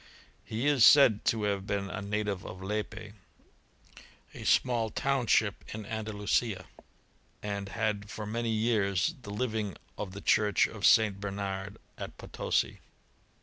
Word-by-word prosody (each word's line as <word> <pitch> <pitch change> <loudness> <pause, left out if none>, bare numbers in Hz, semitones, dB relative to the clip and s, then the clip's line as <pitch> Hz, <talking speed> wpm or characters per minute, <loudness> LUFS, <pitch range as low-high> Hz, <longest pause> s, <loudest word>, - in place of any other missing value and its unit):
He 115 +4 -3
is 145 -5 +4
said 125 -8 +7
to 110 -2 +1
have 100 -1 -1
been 100 -1 -2
a - - -4
native 100 -2 -2
of 95 +1 -8
Lepe, 105 +1 -4 1.2
a - - -9
small 120 -3 +2
township 120 -5 +1
in 110 -1 -6
Andalusia, 105 -2 -1 0.8
and 100 -1 -3
had 105 -1 -2
for 110 -1 -6
many 115 +2 -2
years 110 - +1
the 100 - -10
living 110 -3 -2 0.2
of 95 -3 -4
the 100 - -7
church 105 -2 +3
of - - +1
St. 105 -3 +5
Bernard 100 -1 -4 0.2
at - - -7
Potosi. - - -1
105 Hz, 135 wpm, -30 LUFS, 100-110 Hz, 1.2 s, said